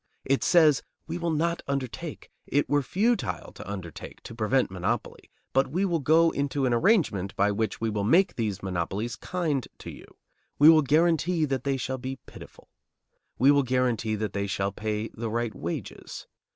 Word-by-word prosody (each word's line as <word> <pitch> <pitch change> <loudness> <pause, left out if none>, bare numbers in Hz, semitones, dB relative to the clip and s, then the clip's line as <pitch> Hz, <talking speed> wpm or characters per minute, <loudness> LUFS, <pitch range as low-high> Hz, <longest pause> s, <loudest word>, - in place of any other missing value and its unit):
It 135 0 +1
says: 155 -6 +5 0.2
"We 170 +2 -5
will 170 0 -1
not 170 +2 0
undertake, 140 +3 -5 0.2
it 145 +1 +1
were 145 0 +2
futile 195 - -1
to 100 - -9
undertake, 90 -5 -8
to - - -9
prevent 115 0 +1
monopoly, 90 -1 -3 0.2
but 135 +1 +3
we 180 +8 0
will 170 -3 0
go 160 +3 +4
into 140 -1 -1
an 125 - +2
arrangement 115 - +2
by 100 +1 +2
which 110 +2 -2
we 115 -1 -1
will 105 -1 -2
make 175 - +4
these 105 -4 -3
monopolies 95 +5 -3
kind 160 -8 -2
to - - -8
you. - - -13 0.5
We 150 +2 +8
will 160 -1 +7
guarantee 160 +2 +2
that 135 -3 -3
they 135 -1 +1
shall 130 0 -3
be 130 +1 -4
pitiful. - - -13 0.7
We 135 +4 +5
will 145 0 +4
guarantee 125 -4 0
that 105 0 -3
they 100 0 -2
shall 100 0 -1
pay 105 +2 -3
the 115 0 -5
right 115 0 -2
wages. 85 +2 -6
130 Hz, 180 wpm, -27 LUFS, 110-155 Hz, 0.7 s, We